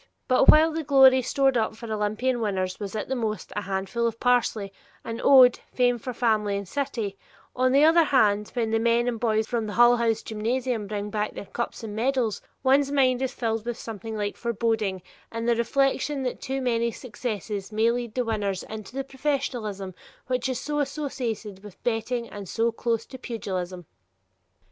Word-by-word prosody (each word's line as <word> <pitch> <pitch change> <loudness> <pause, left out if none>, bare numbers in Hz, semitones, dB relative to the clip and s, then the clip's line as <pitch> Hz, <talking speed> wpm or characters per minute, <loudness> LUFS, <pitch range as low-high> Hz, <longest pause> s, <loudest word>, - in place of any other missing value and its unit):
But 255 - +4
while 315 +1 +7
the 320 0 -3
glory 265 -2 +6
stored 270 +1 +2
up 220 -1 0
for 230 - -9
Olympian 220 +3 -1
winners 185 -3 -2
was 205 0 -5
at 215 - -3
the 265 - -2
most 215 -6 -3
a 210 - -1
handful 195 +4 -1
of 230 0 -4
parsley, 230 -5 +1 0.3
an 230 0 -5
ode, 255 -3 +7
fame 245 -1 +2
for 255 - -5
family 215 -4 +1
and 200 -1 -6
city, 225 -6 -3 0.4
on 255 0 +2
the 280 +2 +5
other 325 +1 +6
hand, 210 -7 +3
when 230 -2 0
the 225 - +2
men 235 +1 +2
and 235 -2 -1
boys 220 -1 +1
from 230 -2 -2
the 210 - -5
Hull 240 +2 +6
House 225 -2 0
gymnasium 230 0 -2
bring 205 0 -4
back 210 0 -2
their - - -6
cups 235 +4 -5
and 210 -2 -6
medals, 240 -2 0 0.2
one's 275 +1 +3
mind 260 -3 +3
is 265 -1 -1
filled 225 -3 -2
with 240 0 -4
something 220 -1 -6
like 205 -1 -3
foreboding 220 -5 -1 0.3
in 230 0 -4
the 235 0 +3
reflection 275 +4 0
that 250 - -3
too 270 +1 -3
much 235 -2 0
success 210 -4 -5
may 220 +2 +3
lead 240 -2 -4
the 250 -1 0
winners 205 -4 -2
into 220 +2 -9
the 270 - -2
professionalism 255 -8 -3 0.3
which 255 +1 -1
is 255 - -2
so 295 0 -2
associated 250 -9 -4
with 200 -2 -13
betting 235 +1 -1
and 200 -3 -9
so 230 +1 +1
close 230 -1 -1
to 260 - -11
pugilism. 185 -7 -5
230 Hz, 185 wpm, -26 LUFS, 210-255 Hz, 0.4 s, while